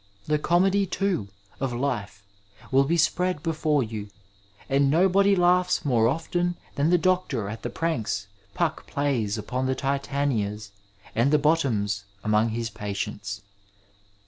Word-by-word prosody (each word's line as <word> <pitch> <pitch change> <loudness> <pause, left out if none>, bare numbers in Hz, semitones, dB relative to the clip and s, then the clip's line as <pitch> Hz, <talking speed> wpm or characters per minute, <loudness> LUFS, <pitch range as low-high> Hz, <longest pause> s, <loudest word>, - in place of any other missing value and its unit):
The 150 0 +1
comedy, 190 +5 +2
too, 185 - -1 0.3
of 135 -1 -1
life 115 -6 -3 0.5
will 135 +1 +4
be 170 +4 +1
spread 175 0 +1
before 155 -3 +1
you, 105 -2 -6 0.6
and 140 0 +3
nobody 190 +5 +4
laughs 180 -1 +3
more 120 -5 +3
often 175 +5 -1 0.2
than 145 +3 +1
the 180 - +5
doctor 170 - 0
at 110 +2 -6
the - - -3
pranks 115 -11 -2 0.3
Puck - - -1
plays 125 -8 0
upon 125 +4 -2
the 130 - 0
l^tanias 135 -7 -1 0.4
and 120 +5 +2
the 150 - +5
Bottoms 115 -10 +1 0.2
among 110 +1 +2
his 115 +1 -3
patients. 100 -1 -5
140 Hz, 135 wpm, -26 LUFS, 110-165 Hz, 0.6 s, the